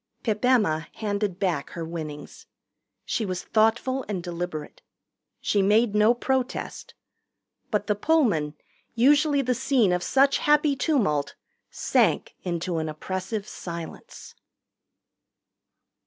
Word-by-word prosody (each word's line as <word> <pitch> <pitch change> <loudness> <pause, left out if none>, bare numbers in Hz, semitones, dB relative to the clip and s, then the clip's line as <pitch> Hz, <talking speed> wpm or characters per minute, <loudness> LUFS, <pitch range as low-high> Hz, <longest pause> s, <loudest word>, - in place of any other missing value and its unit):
Pip 215 -1 -1
Emma 210 -11 +2
handed 205 -3 -2
back 175 -8 -1
her 165 -1 -6
winnings. 155 -3 -7 0.6
She 225 - -1
was 185 -3 -3
thoughtful 235 +4 +1
and 190 -4 -3
deliberate. 170 -3 -5 0.6
She 205 - +2
made 210 +3 +3
no 215 +3 +4
protest. 260 +1 -3 0.7
But 210 -2 0
the 210 - +2
Pullman, 205 - +1 0.4
usually 285 +3 +4
the 250 0 +1
scene 245 -6 +2
of 180 - 0
such 275 +8 +3
happy 295 -1 +3
tumult, 200 - 0 0.3
sank - - +1
into 175 -1 -2
an 160 0 -2
oppressive 185 +6 -4
silence. 170 -2 -8
210 Hz, 110 wpm, -25 LUFS, 170-250 Hz, 0.7 s, no